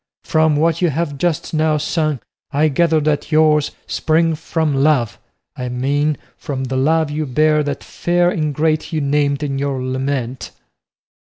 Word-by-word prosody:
From 160 -1 +2
what 165 +4 +1
you 175 - +3
have 150 -1 -3
just 170 -1 -1
now 155 -1 +2
sung 155 -2 -1 0.3
I 150 +2 +2
gather 160 +2 +2
that 150 +1 -1
yours 155 -1 +4 0.2
spring 165 +1 +1
from 160 -1 -1
love, 135 -6 +1 0.4
I 125 -3 -4
mean 145 +4 0 0.2
from 135 -2 -4
the 130 0 -3
love 155 +3 +2
you 155 0 -2
bear 150 +4 +3
that 145 -1 -3
fair 175 0 +1
ingrate 155 0 0
you 160 - -1
named 140 0 0
in 135 -2 -2
your 140 -1 -1
lament." 130 -1 -3
150 Hz, 155 wpm, -18 LUFS, 140-155 Hz, 0.4 s, yours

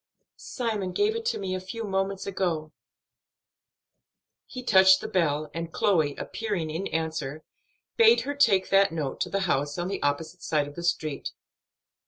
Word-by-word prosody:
"Simon 215 -7 -3
gave 425 +2 +1
it 460 0 -4
to 470 - 0
me 190 -2 -3
a 185 - -2
few 190 +5 -6
moments 195 -1 -2
since." 200 - -6 2.1
He 255 -1 -7
touched 190 -4 +6
the - - -5
bell, 155 -4 0
and, 165 0 -5
Chloe 160 -7 +1
appearing 200 -8 -3
in 170 +5 -3
answer, 155 -2 -3 0.5
bade 460 0 +6
her 285 - -3
take 205 -10 +3
that 195 0 +5
note 150 -5 -4
to - - 0
the 195 - -1
house 145 -5 0
on 175 +1 -2
the 195 - -3
opposite 160 +4 -2
side 150 -2 0
of 145 - -10
the 170 - -7
street. 155 -4 -2
185 Hz, 165 wpm, -27 LUFS, 155-200 Hz, 2.1 s, touched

